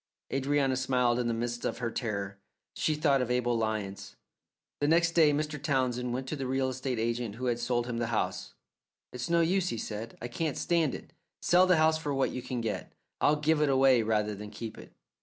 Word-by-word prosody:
Adrianna 135 0 +1
smiled 125 -2 +1
in 120 - 0
the 120 - 0
midst 120 +1 -3
of - - -2
her 115 -1 -2
terror. 100 -5 -3 0.3
She 155 - 0
thought 145 -3 +2
of 125 - -2
Abel 125 -1 +1
Lyons. 110 -3 -3 0.6
The 145 - +1
next 170 +2 +4
day 160 -3 +5
Mr. 150 0 -2
Townsend 125 -3 0
went 130 +2 -3
to - - -2
the 135 -3 -4
real 130 0 0
estate 130 -1 -3
agent 115 -1 -2
who 125 +2 -5
had 120 -1 0
sold 120 0 0
him 120 -1 -3
the 120 - -1
house. 115 -2 -2 0.6
"It's 125 +6 -4
no 170 0 +4
use," 180 +2 +2
he 115 - -3
said, 110 +1 -6
"I 120 - -5
can't 150 +4 -2
stand 165 -5 +1
it. - - -11 0.3
Sell 180 +1 +5
the 180 -2 +5
house 160 0 +3
for 145 -3 -2
what 135 - +1
you 125 - -4
can 125 -1 -4
get. 115 -2 -3 0.3
I'll 150 - +4
give 150 +1 +1
it 150 - +3
away 135 -2 +5
rather 105 -1 0
than 105 +1 -8
keep 110 +1 -7
it." - - -12
125 Hz, 215 wpm, -30 LUFS, 115-150 Hz, 0.6 s, day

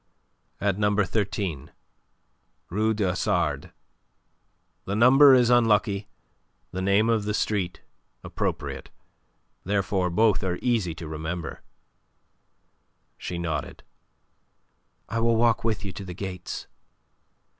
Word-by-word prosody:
"At 100 -1 0
number 105 -1 +2
13, 95 -7 -3 1.0
Rue 110 +4 +1
du 105 - -1
Hasard. 85 -5 0 1.1
The 100 - -2
number 135 +4 +7
is 125 -1 +4
unlucky, 105 -4 +3 0.6
the 95 - -4
name 100 +3 +3
of 115 -3 +1
the 105 0 -1
street 95 -6 -1 0.4
appropriate. - - -4 0.7
Therefore 95 -1 0
both 105 +3 +2
are 90 -2 -1
easy 110 -10 0
to 85 -1 -8
remember." 80 +2 -5 1.6
She 90 - -5
nodded. 80 -3 -4 1.2
"I 115 +2 -2
will 115 0 +3
walk 115 -1 +2
with 110 -2 -1
you 95 - -4
to 95 +2 -8
the 90 -2 -8
gates." 90 -2 -6
100 Hz, 110 wpm, -26 LUFS, 90-110 Hz, 1.6 s, number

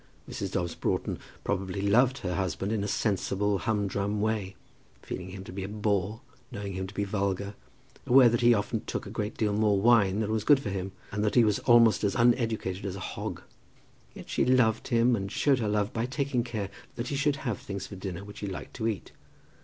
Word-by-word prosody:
Mrs. 95 -2 -5
Dobbs 85 -3 -1
Broughton - - -2 0.2
probably 95 0 -2
loved 120 +7 +3
her 90 -8 -3
husband 95 +1 -2
in 110 -3 0
a - - -2
sensible, 100 -1 0
humdrum 100 -1 -1
way, 105 -3 -1 0.5
feeling 90 0 -6
him 95 0 -8
to - - -9
be 95 0 -4
a - - -4
bore, 105 +1 -1 0.3
knowing 100 -4 -5
him 95 0 -3
to 95 - -11
be 100 - 0
vulgar, 100 0 -2 0.5
aware 125 0 +8
that 120 0 +2
he 120 0 +6
often 110 0 0
took - - -4
a 100 - -8
good 105 -1 -3
deal 105 -2 +1
more 105 -1 +3
wine 110 -2 +4
than 110 0 -1
was 110 -1 0
good 145 +1 +6
for 105 -7 -4
him, 95 0 -3 0.2
and 105 +1 -1
that 105 - 0
he 120 - +7
was 105 -2 +2
almost 115 -3 +5
as 100 - +1
uneducated 115 -6 +1
as 95 -2 -3
a - - -6
hog. - - -5 0.7
Yet - - -10
she - - +1
loved 125 -4 +3
him, 120 0 +3
and 100 -2 -4
showed 130 +5 +2
her 110 -3 0
love 105 +3 0
by 115 +1 -1
taking 135 -2 -1
care 110 -5 -4 0.2
that 120 +1 -4
he 145 - -2
should 145 +1 +2
have 120 -7 -3
things 100 -1 -5
for 100 - -9
dinner 95 0 -5
which 105 0 -10
he 105 - -4
liked 95 - -7
to 115 -2 -1
eat. 105 -5 -3
105 Hz, 215 wpm, -28 LUFS, 100-115 Hz, 0.7 s, aware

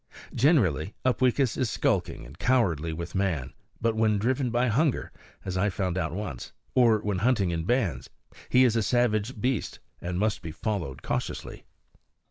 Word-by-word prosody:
Generally 105 - +2
Upweekis 130 -1 +2
is 125 - 0
skulking - - -1
and 70 +7 -14
cowardly 85 - +1
with 85 +2 -6
man; 85 -9 -1 0.3
but 115 -1 +1
when 110 -1 +2
driven 125 +4 0
by 120 +2 +1
hunger 135 +5 +1 0.3
(as 95 -1 -3
I 100 +3 +2
found 90 -2 -2
out 80 -5 -1
once) 90 -9 -6 0.2
or 115 -4 +4
when 105 -3 -1
hunting 105 -5 +2
in 80 -1 -2
bands, 100 - 0 0.4
he 130 - +5
is 120 -3 +3
a 115 - +2
savage 115 0 +1
beast 125 -2 -1 0.2
and 90 0 -3
must 105 +2 0
be 80 - -6
followed 80 - -4
cautiously. - - -4
105 Hz, 160 wpm, -27 LUFS, 85-120 Hz, 0.4 s, he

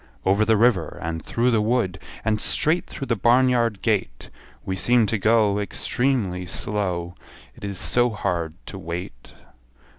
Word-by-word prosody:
Over 100 +3 +3
the 110 0 +3
river, 110 -8 +2
and 80 -1 -4
through 120 +2 +1
the 115 -2 +2
wood, 105 -4 0 0.3
And 110 -1 +1
straight 165 +3 +1
through 135 - -6
the 115 - 0
barn 120 +5 +4
yard 115 -5 0
gate; 105 -4 -1 0.3
We 95 - -2
seem 120 +4 +3
to 110 0 -1
go 105 -1 +3
Extremely 105 -4 -1
slow, 90 -3 -2 0.4
It - - -16
is 100 -2 -4
so 120 +5 +2
hard 85 -7 -2
to 95 - -8
wait. 85 -8 -7
105 Hz, 155 wpm, -23 LUFS, 90-120 Hz, 0.4 s, barn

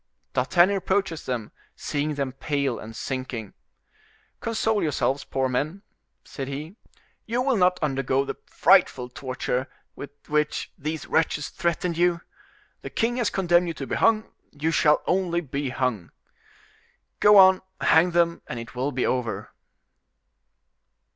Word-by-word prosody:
D'Artagnan 175 +9 +3
approaches 190 -3 -1
them, 120 -4 -3 0.2
seeing 150 +1 -2
them 140 -2 -2
pale 140 -2 -1
and 115 +1 -9
sinking: 130 -5 -5 0.9
"Console 220 -2 0
yourselves, 140 -2 0
poor 135 -1 -1
men," 150 +10 -2 0.4
said 135 -2 -6
he, 150 +7 -6 0.5
"you 235 +2 -1
will 265 -1 +2
not 180 -2 +3
undergo 135 -1 0
the - - -3
frightful 125 0 +3
torture 130 0 -3 0.3
with 140 - -7 0.2
which 150 0 -1
these 155 +1 -4
wretches 155 -2 0
threatened 170 0 -2
you. 175 -1 +2 0.6
The - - -7
king 240 +2 0
has 235 -4 +1
condemned 175 -2 +2
you 165 - -4
to 135 - -5
be - - -5
hung: 220 0 +2 0.2
you 155 +2 -2
shall 150 -2 +3
only 180 -2 +1
be 140 -3 -3
hung. 125 -9 -2 1.1
Go 210 0 +7
on, 190 -1 +7 0.2
hang 160 +3 +4
them, 170 -1 +1
and 120 - -5
it 115 0 -9
will 130 +3 -1
be 130 -1 -1
over." 125 -3 -2
150 Hz, 140 wpm, -25 LUFS, 130-180 Hz, 1.1 s, Go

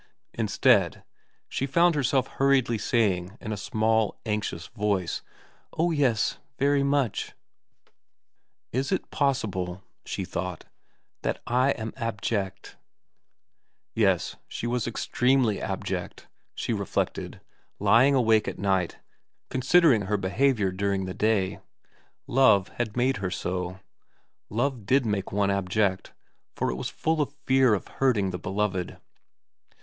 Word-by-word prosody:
Instead, - - +2 0.4
she 135 - -2
found 170 +5 +4
herself 135 -3 +1
hurriedly 135 -5 +2
saying 100 -4 0
in 110 - -6
a - - -1
small, 110 +1 0
anxious 105 -6 -2
voice, 100 -5 -1 0.3
* - - -34
Oh 170 +2 +2
yes 130 -8 +1 0.2
very 140 0 +3
much! 140 -4 0 0.4
' - - -43
' - - -54
Is 130 +6 -1
it 190 - -2
possible,' 100 - -1 0.2
she 95 - -4
thought, 90 -1 -5 0.3
* - - -47
that - - -2
I 125 +3 +2
am 110 -1 -5
abject? 100 -3 -3 0.6
' - - -55 0.3
Yes, - - +1
she - - -5
was 120 -1 -1
extremely 125 -1 +1
abject, - - -4 0.3
she - - -2
reflected, - - -2 0.4
lying 130 +5 +5
awake 110 -4 +3
at - - -4
night 95 -3 0 0.5
considering 130 - +4
her 105 +1 +1
behaviour 100 +1 +1
during 95 0 -1
the 95 - -4
day. 100 -3 +1 0.7
Love 110 -7 +4
had 120 -2 -4
made 125 0 +2
her 95 -2 -2
so. 90 0 -3 0.7
Love 120 -1 -1
did 130 -1 +3
make 100 -3 -2
one 100 0 +1
abject, 100 0 0 0.4
for - - 0
it - - -3
was 65 - -4
full 160 -1 0
of 145 0 -3
fear 130 -4 +4
of 95 - -6
hurting 110 -8 +1
the 90 - -5
beloved. 95 -3 -2
110 Hz, 135 wpm, -26 LUFS, 95-130 Hz, 0.7 s, lying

